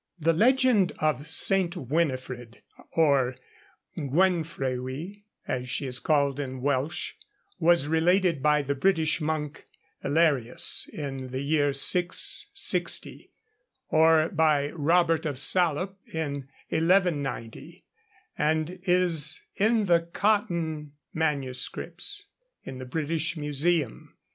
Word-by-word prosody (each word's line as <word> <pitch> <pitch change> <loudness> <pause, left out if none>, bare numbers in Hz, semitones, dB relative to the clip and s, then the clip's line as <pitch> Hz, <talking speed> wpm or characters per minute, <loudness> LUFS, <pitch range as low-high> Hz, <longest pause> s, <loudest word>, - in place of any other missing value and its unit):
The 165 0 +2
legend 240 -1 +3
of 155 -2 -1
St. 185 +2 +2
Winifred, 130 -5 -3 0.3
or 140 -6 +2 0.6
Gwenfrewi, 160 +1 -2 0.2
as 125 0 -3
she 140 - -2
is 125 -1 -2
called 140 -2 +1
in 130 -2 -5
Welsh, 140 +2 -1 0.5
was 170 -3 +3
related 165 0 +2
by 150 0 +3
the 140 +1 -1
British 160 +1 +1
monk 150 -1 -3 0.4
Elerius 145 -5 +2
in 135 -3 -5
the 130 +2 -4
year 145 0 +2
660, 175 +6 0 0.6
or 160 0 +4
by 150 -4 +2
Robert 165 0 +2
of 145 -3 -4
Salop 180 +5 +1
in 140 -4 -4 0.2
1190, 160 -9 -1 0.5
and 160 +4 -1
is 180 -5 +2 0.2
in 220 +1 +2
the 170 -3 +4
Cotton 170 -5 -1 0.2
MSS. 160 - -2 0.4
in 130 -1 -8
the 130 - -7
British 160 +4 -2
Museum. 150 -1 -2
155 Hz, 100 wpm, -26 LUFS, 140-175 Hz, 0.6 s, or